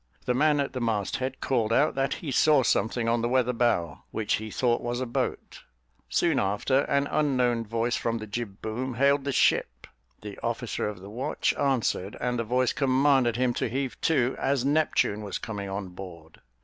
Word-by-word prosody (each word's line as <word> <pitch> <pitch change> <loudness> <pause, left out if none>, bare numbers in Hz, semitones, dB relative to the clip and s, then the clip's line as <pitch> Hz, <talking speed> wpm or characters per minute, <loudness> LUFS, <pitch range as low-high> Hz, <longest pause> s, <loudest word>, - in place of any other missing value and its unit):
The 125 - +1
man 145 +3 +3
at 140 - -1
the 130 - -4
mast 110 -4 -1
head 130 0 -4
called 115 -4 0
out 145 +6 +3
that 135 0 0
he 150 - -6
saw 150 +1 +4
something 115 0 +1
on 115 0 +2
the 120 - 0
weather 125 -1 +2
bow, 100 - 0
which 110 -2 -1
he 110 +1 -6
thought 120 +2 +1
was 120 0 -2
a 130 - -1
boat; 120 - -3 0.5
soon - - +2
after, 105 +7 +1
an 140 0 +1
unknown 125 -7 +1
voice 115 +2 0
from 115 0 -1
the 110 - -6
jib 105 -2 -6
boom 125 +3 -3
hailed 140 +2 +3
the 140 - 0
ship; 60 - +1 0.4
the 105 -1 -8
officer 115 -2 -2
of 100 -3 -8
the 100 +2 -10
watch 130 +7 -1
answered; 125 -8 -1
and 125 -1 -1
the - - 0
voice 125 +2 +1
commanded 135 -3 +3
him 125 0 +1
to 120 - -2
heave 130 +2 -3
to, 130 -6 +2
as 135 -2 0
Neptune 145 -8 +1
was 100 -3 -4
coming 100 -3 -5
on 95 -1 -4
board. 90 -3 -11
120 Hz, 195 wpm, -27 LUFS, 110-135 Hz, 0.5 s, saw